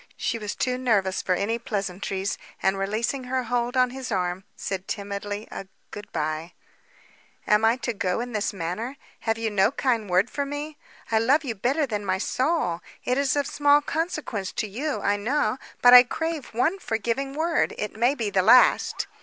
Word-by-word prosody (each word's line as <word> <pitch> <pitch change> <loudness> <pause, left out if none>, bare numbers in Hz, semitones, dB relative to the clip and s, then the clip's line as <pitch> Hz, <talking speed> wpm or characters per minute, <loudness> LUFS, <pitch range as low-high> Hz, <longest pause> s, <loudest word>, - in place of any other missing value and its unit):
She 230 - -2
was 210 -1 -4
too 255 -1 -1
nervous 200 -7 +1
for 185 - +1
any 220 +5 -1
pleasantries, 195 -2 -3 0.2
and 190 0 +2
releasing 220 +7 -2
her 255 0 -1
hold 245 +1 -1
on 250 -1 +4
his 260 -1 -6
arm, 180 -1 -1
said 190 -1 -4
timidly, 205 +1 -4
a 195 - -7 0.2
"Good 205 0 -9
bye!" 155 +1 -3 0.9
"Am 210 +1 +3
I 225 +1 +5
to 235 - -1
go 185 -1 -1
in 245 +1 -4
this 210 -1 0
manner? 200 +9 -4 0.2
Have 225 -1 -1
you 225 -1 -2
no 200 +2 +3
kind 235 -7 0
word 180 +4 +3
for 285 - -3
me? 290 +2 -5 0.4
I 220 - +4
love 275 +8 +3
you 250 -5 -3
better 260 +9 0
than 210 -5 -3
my 190 -1 0
soul. 255 - 0 0.2
It 250 +2 +1
is 280 0 +1
of 285 -1 +1
small 290 +1 +4
consequence 295 - -3
to 215 - -2
you, 270 +9 -3
I 205 0 +1
know, 255 +5 0 0.2
but 245 0 +9
I 250 - +13
crave 320 +3 -3
one 315 - 0
forgiving 235 - -2
word. 325 +1 +1
It 210 - -4
may 240 +5 +2
be 225 -6 -2
the 190 - +3
last." 250 +7 +5
230 Hz, 185 wpm, -25 LUFS, 200-265 Hz, 0.9 s, I